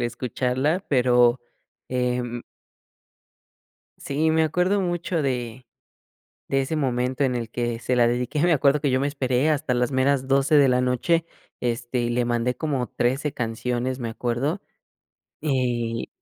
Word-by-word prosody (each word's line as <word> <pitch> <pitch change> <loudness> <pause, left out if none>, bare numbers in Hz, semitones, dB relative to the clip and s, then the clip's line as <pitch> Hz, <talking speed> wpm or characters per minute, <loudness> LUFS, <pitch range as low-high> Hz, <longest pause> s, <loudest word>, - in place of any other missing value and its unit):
El - - -1
escucharla, 125 - -1
pero, 125 -2 +4 0.5
em 125 -1 -2 1.6
sí 155 +3 0
me 160 0 +3
acuerdo 180 +5 +1
mucho 175 -2 -1
de 125 -2 -3 0.9
de 135 0 +2
ese 155 +4 -2
momento 130 -1 0
en 125 -2 -1
el 115 -2 -3
que 120 -1 -2
se 125 +1 -1
la 120 - +5
dediqué, 125 +5 -1
me 175 0 +4
acuerdo 145 0 +3
que 145 - 0
yo 130 0 +1
me 140 - +1
esperé 135 0 0
hasta 145 -3 0
las 125 +2 0
meras 130 0 +1
12 135 +2 +3
de 140 -2 +6
la 125 0 +3
noche, 125 +7 +1 0.3
este, 120 +1 -2
y 120 - -1
le 120 +1 +1
mandé 120 +1 0
como 140 -6 -2
13 135 +4 -1
canciones, 125 +2 -2
me 120 - -3
acuerdo, 120 - -2 0.8
eh 120 -5 -1
125 Hz, 150 wpm, -24 LUFS, 120-145 Hz, 1.6 s, de